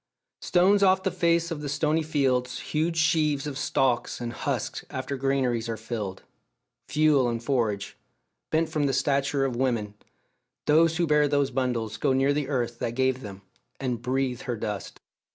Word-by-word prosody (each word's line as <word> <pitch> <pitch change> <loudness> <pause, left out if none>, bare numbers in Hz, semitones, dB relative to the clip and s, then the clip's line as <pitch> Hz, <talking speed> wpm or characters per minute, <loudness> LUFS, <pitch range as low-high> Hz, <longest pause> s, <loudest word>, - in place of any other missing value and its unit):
Stones 190 +3 +3
off 190 -1 +4
the 190 - 0
face 170 -1 +1
of 155 -3 -4
the 145 - -4
stony 150 +2 +1
fields, 135 -5 0
huge 165 +2 -1
sheaves 155 -3 +2
of 145 -2 -4
stalks 130 -3 0
and 120 -1 -4
husks - - -3
after 130 +2 -4
granaries 130 -4 0
are 115 - -2
filled, 110 -4 -5 0.7
fuel 150 -5 +3
and 115 0 -3
forage 115 -6 -1 0.5
bent 160 +1 +1
from 150 -2 -1
the 135 - 0
stature 140 0 +1
of 130 -3 -2
women, 120 -5 -1 0.7
those 160 +2 +4
who 175 - +2
bear 150 -1 +3
those 140 -1 +1
bundles 120 -4 -1
go 140 -3 +1
near 135 +2 +3
the 145 -2 -1
earth 120 -4 -2
that 115 - -3
gave 130 0 +1
them, 100 -3 -9 0.4
and 125 -3 -2
breathe 130 0 -1
her 120 - -3
dust. 105 -3 -5
135 Hz, 170 wpm, -26 LUFS, 120-150 Hz, 0.7 s, off